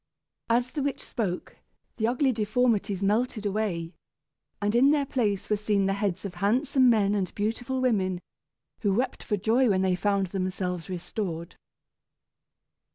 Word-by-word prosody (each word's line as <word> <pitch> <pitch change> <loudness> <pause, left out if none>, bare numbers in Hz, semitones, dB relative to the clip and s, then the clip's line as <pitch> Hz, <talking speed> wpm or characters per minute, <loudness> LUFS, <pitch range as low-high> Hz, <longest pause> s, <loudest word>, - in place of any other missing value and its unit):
As 245 +2 +2
the 295 - -3
witch 280 0 -2
spoke, 190 -6 -4 0.4
the 220 - +1
ugly 255 +3 +2
deformities 215 -3 +1
melted 215 +2 +1
away, 190 -5 -1 0.7
and 205 0 0
in 250 +4 +5
their 290 -1 +3
place 210 -8 -1
were 210 - +2
seen 205 -1 +1
the 195 - +1
heads 200 -2 -2
of 195 - -4
handsome 250 +8 +3
men 205 -3 +3
and 195 -3 -1
beautiful 230 +5 -2
women, 190 -8 +1 0.6
who 200 -3 +1
wept 250 +3 -1
for 210 - -1
joy 230 +5 +3
when 190 -2 +2
they 185 -1 +2
found 200 +1 +1
themselves 185 -2 -2
restored. 175 -2 -4
210 Hz, 150 wpm, -27 LUFS, 190-240 Hz, 0.7 s, in